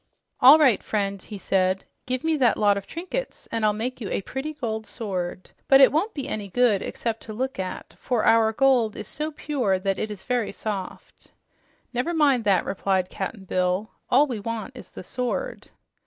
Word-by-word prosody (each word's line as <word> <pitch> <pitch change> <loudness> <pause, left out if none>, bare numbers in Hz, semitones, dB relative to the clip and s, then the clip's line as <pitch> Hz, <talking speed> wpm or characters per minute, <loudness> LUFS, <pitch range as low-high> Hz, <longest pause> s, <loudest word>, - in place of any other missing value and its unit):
"All 275 +3 +9
right, 270 -9 +4
friend," 200 -2 -2
he 210 - -9
said. 190 0 0 0.2
"Give 255 0 -2
me 320 0 +2
that 255 -4 +3
lot 205 -1 +4
of 200 0 -5
trinkets 375 +9 -5
and 225 -1 -2
I'll 215 - +4
make 245 +4 -4
you 205 - -4
a - - -2
pretty 270 +8 -4
gold 220 -7 -4
sword. 185 -4 -5 0.2
But 270 - +7
it 270 - +8
won't 365 +9 0
be 280 -2 -4
any 215 -7 -4
good 220 -1 +2
except 230 -1 -3
to 215 - -8
look 260 +1 -3
at, 185 -1 -5
for 245 -4 0
our 225 -1 +5
gold 245 -3 +3
is - - -7
so 305 +1 -3
pure 275 -10 0
that 195 0 -1
it 220 - -2
is 210 -2 -8
very 245 -4 -1
soft." 200 -4 -6 0.6
"Never 255 +8 -1
mind 275 -7 +3
that," 195 -3 +3
replied 190 -1 0
Cap'n 205 -7 -5
Bill. 185 +3 0 0.2
"All 275 +4 +5
we 245 -7 -4
want 230 +3 -5
is 250 - -11
the - - -10
sword." 255 - -4
225 Hz, 195 wpm, -25 LUFS, 200-265 Hz, 0.6 s, All